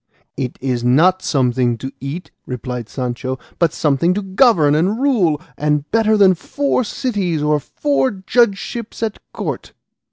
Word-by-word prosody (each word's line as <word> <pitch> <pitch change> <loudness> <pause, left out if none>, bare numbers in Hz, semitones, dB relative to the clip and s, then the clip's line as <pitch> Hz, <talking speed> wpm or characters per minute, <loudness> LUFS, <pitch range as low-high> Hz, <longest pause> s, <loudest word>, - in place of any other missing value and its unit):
"It 125 -2 -4
is 125 -2 -1
not 170 +10 +4
something 125 -5 +1
to 135 +3 -6
eat," 145 +6 -6 0.2
replied 125 -2 -5
Sancho, 130 0 -3 0.2
"but 170 -3 +3
something 155 +5 +1
to 205 - -2
govern 190 - +4
and 185 +9 +1
rule, 210 - +2 0.2
and 150 0 0
better 220 -1 +3
than 195 -2 +6
four 275 - -1
cities 200 - -2
or 150 0 +2
four 140 -2 0
judgeships 220 +3 -1
at 220 -2 -2
court." - - -5
160 Hz, 140 wpm, -18 LUFS, 135-205 Hz, 0.2 s, than